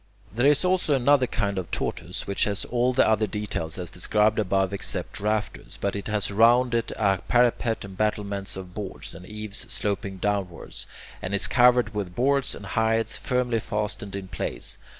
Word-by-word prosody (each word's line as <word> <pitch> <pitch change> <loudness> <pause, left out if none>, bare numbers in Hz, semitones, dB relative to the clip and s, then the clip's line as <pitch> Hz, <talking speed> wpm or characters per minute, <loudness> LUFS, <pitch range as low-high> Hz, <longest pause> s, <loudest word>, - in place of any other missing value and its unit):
There 120 +5 +3
is 145 +4 +4
also 180 -5 +2
another 135 0 +4
kind 100 -5 -1
of 90 - -6
tortoise, 85 +2 -3
which 100 - +1
has 105 0 -2
all 125 +1 +1
the 130 - +4
other 110 0 +2
details 105 -7 -3
as 90 -3 -6
described 105 +4 +2
above 95 -1 +1
except 100 - -1
the - - -9
rafters, 105 0 -2
but 100 - -1
it 100 -1 -4
has 105 -2 0
round 120 +4 +4
it 115 -1 0
a 100 -3 +2
parapet 120 -2 +2
and 95 -1 -10
battlements 100 -1 -2
of 95 -1 -8
boards, 100 -4 -7
and 90 +2 -11
eaves 105 -1 -4
sloping 100 -1 -1
downwards, 95 -3 -3 0.3
and 95 +2 -2
is 100 - +5
covered 125 -3 +4
with 100 -4 -4
boards 140 +2 +1
and - - -9
hides 110 0 +1
firmly 125 -2 0
fastened 105 -2 -3
in 95 -1 -5
place. 85 -3 -4
105 Hz, 180 wpm, -25 LUFS, 100-120 Hz, 0.3 s, is